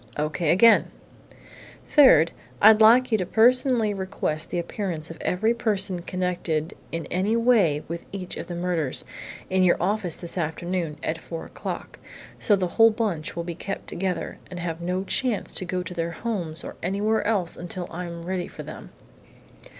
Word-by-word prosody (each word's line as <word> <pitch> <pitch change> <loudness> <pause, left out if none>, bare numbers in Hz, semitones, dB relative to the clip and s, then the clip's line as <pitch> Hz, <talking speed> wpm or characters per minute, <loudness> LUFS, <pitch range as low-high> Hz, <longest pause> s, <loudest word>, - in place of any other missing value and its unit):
"O.K. 150 +2 -1
again!" 225 +8 +6 1.0
"Third, 170 - +6 0.3
I'd 220 +1 +7
like 240 +3 +6
you 215 -4 +2
personally 240 +3 +3
to 195 - -7
request 185 -5 -2
the - - -3
appearance 170 -2 -3
of 165 - -11
every 220 +6 +1
person 200 -6 +1
connected 175 -3 -2 0.2
in 165 -2 -3
any 195 +5 +1
way 220 -11 +3
with 170 +1 -6
each 185 -2 -5
of - - -6
the 175 - -5
murders, 170 -6 -1 0.4
in 190 0 +1
your 180 -1 +4
office 185 -1 0
this 175 +1 -4
afternoon 170 0 -2
at 160 +1 -2
four 165 0 -7
o'clock - - -7 0.4
so 210 - +4
the 190 -2 0
whole 225 +6 +5
bunch 205 -8 -2
will 170 - -3
be 170 0 -5
kept 195 +3 -6
together 180 -2 -3
and 180 - -7
have 170 -1 -4
no 180 +2 -1
chance 235 +2 -1
to 185 - +1
go 180 0 -2
to 180 - -7
their 170 -1 -2
homes 175 -9 -4
or - - -8
anywhere 205 +5 0
else 200 -6 0
until 175 +1 -6
I 180 +2 -5
am 170 -1 -7
ready 180 0 -3
for - - -9
them. - - -9
180 Hz, 175 wpm, -25 LUFS, 170-210 Hz, 1.0 s, I'd